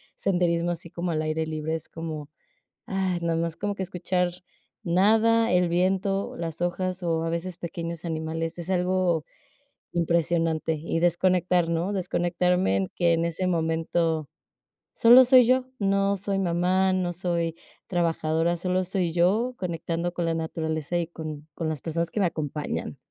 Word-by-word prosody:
senderismo 175 -2 +1
así 170 0 -6
como 170 +1 -3
al 155 -1 0
aire 155 +1 -1
libre 155 0 -3
es 160 - -6
como, 155 -3 -6 0.6
ay, 190 -2 -1
nada 165 -1 0
más 165 -1 -1
como 205 0 -3
que 190 - -3
escuchar 180 0 -1 0.5
nada, 220 +6 +4
el 180 -1 +3
viento, 190 +3 0
las 165 -1 -5
hojas 185 +1 -1
o 165 -1 0
a 165 - -1
veces 170 +1 -3
pequeños 170 0 -5
animales, 165 0 -3
es 170 - -6
algo 180 -3 +1 0.7
impresionante. 165 -1 +1
Y 165 +2 -2
desconectar, 175 0 +2
¿no?, 170 +4 0
desconectarme 180 - +1
en 95 -1 0
que 170 -1 +3
en 165 0 +1
ese 170 +2 -2
momento, 165 -2 0 0.7
solo 240 +3 +8
soy 255 0 +7
yo. 255 0 +3
No 200 0 +2
soy 195 0 -2
mamá, 185 +1 +2
no 180 -1 0
soy 170 -2 -1 0.3
trabajadora, 165 -1 +1
solo 185 +1 0
soy 180 -2 -1
yo 210 +9 +2
conectando 170 -1 -3
con 175 -1 -2
la 165 - +1
naturaleza 160 0 -3
y 170 -1 -1
con 155 -3 -7
con 165 -2 -2
las 155 -4 -4
personas 165 0 -2
que - - -2
me 195 - +3
acompañan. 150 -2 -4
170 Hz, 155 wpm, -26 LUFS, 165-185 Hz, 0.7 s, solo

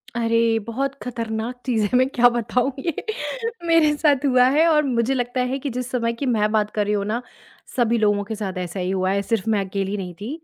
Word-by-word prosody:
अरे, 230 -1 +2
बहुत 270 +4 -2
खतरनाक 230 0 -4
चीज़ 235 -4 +1
है, 205 - 0
मैं 255 +1 +4
क्या 245 -2 +5
बताऊँ। 240 +2 0
ये 335 +4 -2 0.7
मेरे 325 -3 +4
साथ 290 -3 +2
हुआ 255 -2 +5
है 315 +2 +5
और 305 -2 +4
मुझे 245 -1 +1
लगता 245 0 -1
है 270 - -1
कि 280 - -3
जिस 250 0 -4
समय 230 -2 0
की 255 +4 -4
मैं 215 -4 +1
बात 210 -1 +1
कर 210 - 0
रही 210 - 0
हूँ 200 -1 0
ना, 220 +4 -2 0.5
सभी 235 -2 +2
लोगों 205 -2 +2
के 220 +2 -5
साथ 200 -3 -4
ऐसा 180 +1 -4
ही 180 0 -2
हुआ 185 -1 0
है। 200 +1 +1
सिर्फ़ 220 0 -1
मैं 215 -2 +2
अकेली 195 +1 -3
नहीं 180 -3 -5
थी। 215 - -5
230 Hz, 230 wpm, -22 LUFS, 210-255 Hz, 0.7 s, क्या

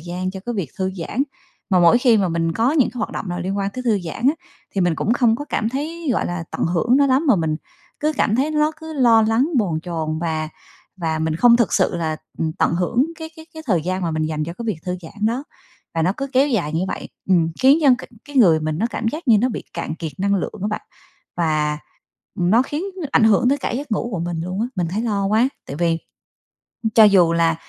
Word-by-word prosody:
gian 180 +3 -4
cho 190 0 -8
cái 240 - -2
việc 185 - -3
thư 190 0 0
giãn. 205 +9 -2 0.5
Mà 185 - +4
mỗi 175 +7 +6
khi 245 -2 +4
mà 195 -4 +1
mình 165 0 0
có 230 - +1
những 290 -6 +3
cái 250 - -9
hoạt 220 - -2
động 190 - -5
nào 175 0 -3
liên 190 +3 -2
quan 195 0 -1
tới 255 - -6
thư 220 -4 +2
giãn 165 +7 -6
á, 295 - +2 0.4
thì 195 - 0
mình 175 -2 +2
cũng 215 - 0
không 235 -2 +3
có 290 - -6
cảm 220 - -1
thấy, 310 +6 -4
gọi - - 0
là, 175 -1 -4
tận - - -2
hưởng 180 +9 +2
nó 280 0 +4
lắm 270 +4 +2
mà 235 - +6
mình 160 -3 0 0.4
cứ 305 +1 +1
cảm 215 - +2
thấy 275 +4 +1
lót 305 +1 +1
cứ 320 0 -7
lo 235 -6 +5
lắng, 225 +6 +2
bồn 170 -8 0
chồn 160 -3 -3
và 160 -2 -2 0.5
và 160 -3 -2
mình 160 0 -1
không 235 +5 +6
thực 235 -6 +1
sự - - +2
là, 160 -2 -2 0.2
ừm, 160 -1 -1
tận 170 -1 +1
hưởng 230 - +1
cái 320 -1 -7
cái 320 0 -12
cái 315 - -8
thời 180 -9 +1
gian 185 +3 -2
mà 170 - 0
mình 155 0 -1
dành 155 -1 -2
cho 170 - -5
cái 235 - -7
việc 215 -6 -1
thư 180 0 -1
giãn 205 +6 -3
đó, 245 +5 -1 0.5
và 165 - +1
nó 180 +4 +2
cứ 275 - -3
kéo 270 +2 +4
dài 185 - -1
như 165 +2 0
vậy, - - -5 0.2
ừm, 170 -4 +3
khiến 270 +4 +6
cho 280 - +6
c - - -13 0.2
cái 290 -1 -8
người 175 -11 +6
mình 155 0 -2
nó 220 - +1
cảm 225 - -2
giác 305 +4 -5
như 220 -3 +6
nó 250 - +2
bị 235 - -5
cạn - - -3
kiệt 160 -3 -5
năng 200 +1 +1
lượng 185 - -3
á 205 - 0
bạn, 215 - -3 0.5
và, 155 -3 0 0.6
ừm, 175 0 +2
nó 230 +4 +5
khiến 295 +6 -4 0.3
ảnh 225 - +5
hưởng 220 +2 +4
tới 280 +2 +2
cả - - -3
giấc 265 +1 -4
ngủ 225 +3 -1
của 180 - -2
mình 170 -1 -3
luôn 185 +3 -4
á. 230 - +1
Mình 175 -2 0
thấy 210 +5 -2
lo 205 -4 0
quá, 220 +5 +3 0.2
tại 140 - -6
vì 165 0 +1 1.0
cho 225 - +9
dù 185 -5 +5
là 165 -1 +2
200 Hz, 260 wpm, -21 LUFS, 170-245 Hz, 1.0 s, cho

